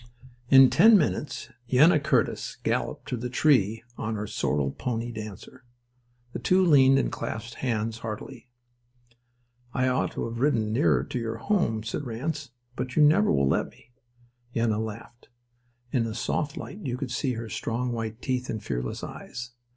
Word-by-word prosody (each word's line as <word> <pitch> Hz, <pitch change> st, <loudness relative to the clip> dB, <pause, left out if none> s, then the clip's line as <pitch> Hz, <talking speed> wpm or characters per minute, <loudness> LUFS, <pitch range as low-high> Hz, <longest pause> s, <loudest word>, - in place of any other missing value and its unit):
In 135 Hz, -1 st, +8 dB
ten 215 Hz, +5 st, +7 dB
minutes 150 Hz, -3 st, -2 dB, 0.2 s
Yenna 150 Hz, +3 st, +5 dB
Curtis 145 Hz, -4 st, 0 dB
galloped -, -, -2 dB
to -, -, -2 dB
the 125 Hz, +1 st, -4 dB
tree 115 Hz, -5 st, +2 dB, 0.2 s
on 110 Hz, 0 st, -2 dB
her 105 Hz, 0 st, -3 dB
sorrel 75 Hz, -8 st, -1 dB
pony 120 Hz, -, -3 dB
Dancer. 110 Hz, +3 st, -9 dB, 0.7 s
The -, -, -4 dB
two 185 Hz, +1 st, +3 dB
leaned 135 Hz, -4 st, +6 dB
and 135 Hz, -, 0 dB
clasped 115 Hz, +2 st, -5 dB
hands 115 Hz, -2 st, -1 dB
heartily. 115 Hz, +3 st, -7 dB, 1.3 s
"I 130 Hz, -1 st, +2 dB
ought 125 Hz, -, 0 dB
to -, -, -3 dB
have 115 Hz, 0 st, -6 dB
ridden 115 Hz, -6 st, +1 dB
nearer 75 Hz, -, +2 dB
your 115 Hz, -2 st, -2 dB
home," 115 Hz, -, 0 dB
said 115 Hz, -, -3 dB
Ranse. 140 Hz, +4 st, -4 dB, 0.3 s
"But 125 Hz, 0 st, -4 dB
you 155 Hz, -, +5 dB
never 165 Hz, +9 st, +5 dB
will 70 Hz, 0 st, +2 dB
let -, -, +1 dB
me." 120 Hz, -, -23 dB, 0.6 s
Yenna 115 Hz, -2 st, +1 dB
laughed. 115 Hz, +3 st, -9 dB, 0.6 s
And 120 Hz, -4 st, +2 dB
in -, -, -3 dB
the 110 Hz, -, -6 dB
soft 140 Hz, +4 st, -2 dB
light 200 Hz, -, -7 dB
you 125 Hz, -4 st, -2 dB
could 130 Hz, -2 st, -5 dB
see 125 Hz, +1 st, -1 dB
her 115 Hz, 0 st, -5 dB
strong 120 Hz, +4 st, -2 dB
white 115 Hz, 0 st, -5 dB
teeth 125 Hz, -1 st, -2 dB
and 110 Hz, -, -4 dB
fearless -, -, -4 dB
eyes. 120 Hz, +1 st, -7 dB
120 Hz, 165 wpm, -27 LUFS, 110-135 Hz, 1.3 s, In